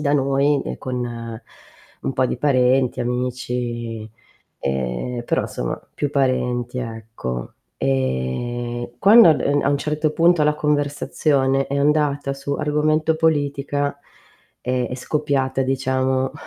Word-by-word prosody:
da 145 -1 +1
noi, 140 +1 +2
ehm, - - -5
con 130 -1 -4 1.0
un - - -2
po' 130 - +2
di - - -2
parenti, 130 -2 +2
amici, 120 -2 -3 0.5
ehm, 65 - -2
però - - +1
insomma, - - -4 0.2
più 145 -1 -1
parenti, 125 -3 0
ecco. 110 - -5 0.3
Ehm, 70 - -2
quando 220 -1 +8
ad 155 - +2
uhm, 145 0 +2
a - - +1
un 140 0 +2
certo 150 +1 0
punto 170 0 +4
la 150 0 +3
conversazione 145 -2 +1
è 140 - -1
andata 145 -1 +1
su 140 +1 -3
argomento 155 +2 +1
politica, 145 -2 0 0.7
è 125 0 -1
è - - -4
scoppiata 135 -1 0
diciamo 130 0 0
135 Hz, 125 wpm, -21 LUFS, 120-145 Hz, 1.0 s, quando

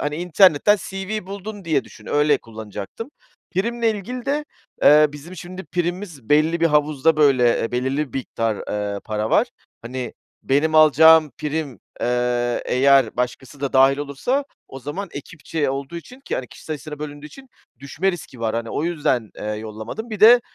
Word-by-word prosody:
hani, 150 0 -2
internetten 180 +2 +4
CV 195 +1 -4
buldun 200 +1 -7
diye 155 -5 +1
düşün, - - -15
öyle 150 0 +3
kullanacaktım. 110 - -8 0.4
Primle 230 +4 +1
ilgili 235 +4 -6
de, 295 +2 0 0.4
ııı, 150 0 +7
bizim 155 +5 -10
şimdi 185 +2 -8
primimiz 175 - -4
belli 155 +3 +3
bir 165 - +5
havuzda, 150 0 +2
böyle, 130 -5 +4
e 115 - -4
belirli 130 +2 -1
bir - - -1
miktar, 115 -4 -2
ııı, 105 -1 -3
para 110 +1 -3
var. - - +3 0.3
Hani, 125 +2 -5 0.3
benim 150 +4 +1
alacağım 155 +1 +7
prim, 150 -5 -3 0.2
eee, 120 0 0
eğer 135 -2 +3
başkası 125 +3 -4
da 140 -1 -2
dâhil 135 +1 +5
olursa 145 - -1 0.2
o 135 - -9
zaman 150 +10 -5
ekipçe 150 -1 -4
olduğu 135 +4 -5
için 250 +10 -11
ki, 275 - -4
hani, 130 - -3
kişi - - -14
sayısına 155 -1 -6
bölündüğü 145 0 -7
için 265 - -14 0.3
düşme 160 +8 -1
riski 140 -8 -9
var. 110 -1 -1
Hani, 115 0 -3
o 150 - -2
yüzden, 145 -9 0
eee, - - -7
yollamadım. 110 - -7
Bir 215 - -5
de, 240 +3 +9
150 Hz, 165 wpm, -22 LUFS, 130-180 Hz, 0.4 s, de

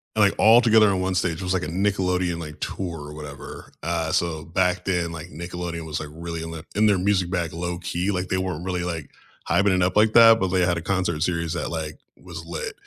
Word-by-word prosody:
And, 110 - +4
like, 100 - +2
all 115 +3 +7
together 110 -2 +5
on 95 -2 0
one 95 0 -1
stage, 90 -2 0
it - - -4
was 90 +1 0
like 90 -1 0
a - - -3
Nickelodeon, 90 -1 0
like, 75 -2 -8
tour 85 -4 -4
or - - -9
whatever. 75 -3 -9
Uh, 80 -1 -1
so 80 -2 -1
back 90 +1 0
then, 90 -3 0
like 80 -2 -7
Nickelodeon 85 -1 -6
was 80 0 -3
like 75 - -6
really 85 +1 -6
l 80 0 -6
in 80 - -8
in 105 +1 +3
their 100 -3 +4
music 95 -1 +1
bag 85 -3 -2
low-key, 90 +2 -2
like, 90 -1 -3
they 95 - +1
weren't 90 -3 -3
really, 90 -2 -2
like, 85 -5 -5 0.4
hyping 100 -1 +3
it 90 - +2
up 90 +1 0
like 105 +1 +4
that, 115 -1 +8
but 95 - +1
they 90 0 +1
had 90 -1 +1
a - - -3
concert 90 -3 -1
series 85 -1 -1
that, - - -3
like, 80 -2 -5 0.2
was 80 - -8
lit. 80 -1 -5
90 Hz, 245 wpm, -24 LUFS, 85-95 Hz, 0.4 s, that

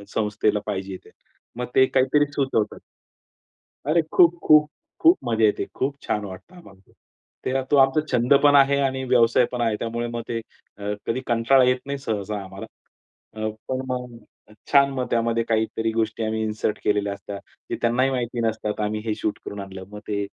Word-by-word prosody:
संस्थेला 105 -1 +1
पाहिजे 95 -2 -4
ते. - - -16 0.5
मग 125 - -2
ते 130 - +7
काहीतरी 135 +3 +2
सुचवतात. 135 -7 -1 1.1
अरे! 165 +2 +4
खूप, 175 -1 +6
खूप, 150 0 +6 0.3
खूप 335 +3 +6
मजा 115 -1 +1
येते. 105 - +1
खूप 140 +2 -1
छान 105 -1 -2
वाटतं 95 - -11
आम्हाला. 100 - -17 0.5
ते 135 +1 0
तो 145 - +5
आमचा 135 +3 +4
छंद 120 +3 +3
पण 145 0 +6
आहे 140 0 +5
आणि 130 -1 -1
व्यवसाय 120 -1 +4
पण 125 -1 -3
आहे. 115 -2 +1
त्यामुळे 120 +1 -3
मग 120 0 -4
ते 115 - -2 0.4
अ, 105 0 -3
कधी 115 +3 -1
कंटाळा 120 +3 +4
येत 125 0 +3
नाही 140 0 -3
सहसा 105 -4 -3
आम्हाला. 95 - -9 0.7
अ, 110 0 -3 0.2
पण 130 0 -1
अ, 130 -1 -3
मग 125 -2 -7 0.5
छान 140 -1 +6
मग 130 -1 -2
त्यामध्ये 115 0 +1
काहीतरी 110 0 0
गोष्टी 110 0 -1
आम्ही 110 0 -1
इन्सर्ट 105 0 -2
केलेल्या 105 -1 +1
असतात. 100 0 -8 0.3
ते - - -1
त्यांनाही 120 +3 +2
माहिती 120 -2 -2
नसतात 110 -1 -3
आम्ही 105 +1 -1
हे 110 - 0
शूट 105 - -3
करून 100 - -6
आणलं. 95 -1 -8
मग 105 - -8
ते 100 -1 -1
115 Hz, 180 wpm, -23 LUFS, 105-130 Hz, 1.1 s, ते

